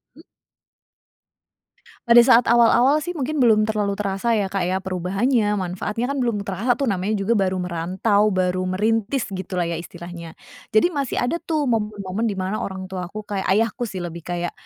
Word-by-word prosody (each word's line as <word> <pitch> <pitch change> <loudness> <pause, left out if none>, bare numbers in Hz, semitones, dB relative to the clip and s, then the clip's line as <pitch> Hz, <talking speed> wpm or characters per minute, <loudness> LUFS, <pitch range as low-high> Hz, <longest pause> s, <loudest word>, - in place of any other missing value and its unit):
Mmm. - - -16 1.8
Pada 235 0 +8
saat 235 0 +6
awal-awal, 240 +5 +5
sih, 350 +4 -5
mungkin 300 +1 -2
belum 220 -4 +5
terlalu 210 -2 -1
terasa, 205 +3 -1
ya, 195 -3 -1
Kak, 195 - -1
ya, 190 +1 -1
perubahannya, 200 +5 0
manfaatnya, 205 +7 -3
kan, 280 - -2
belum 230 -5 -1
terasa, 200 +6 0
tuh, 275 - -3
namanya 200 -2 0
juga 200 +2 -1
baru 195 -4 +2
merantau, 185 +5 +1
baru 185 -2 0
merintis, 220 +6 0
gitu, 185 0 -5
lah, 180 - +1
ya, 165 - -3
istilahnya. 170 -1 -9 0.4
Jadi 280 +12 +4
masih 280 -5 -2
ada, 250 +8 0
tuh, 315 -2 -1
momen-momen 210 -3 -1
di 205 - -2
mana 190 +3 -2
orang 190 -1 -6
tuaku 190 +3 -5
kayak 200 -2 -4
ayahku, 225 +4 +1
sih, 185 -3 -6
lebih 170 -1 -6
kayak, 175 +1 -4
205 Hz, 170 wpm, -22 LUFS, 185-235 Hz, 1.8 s, Pada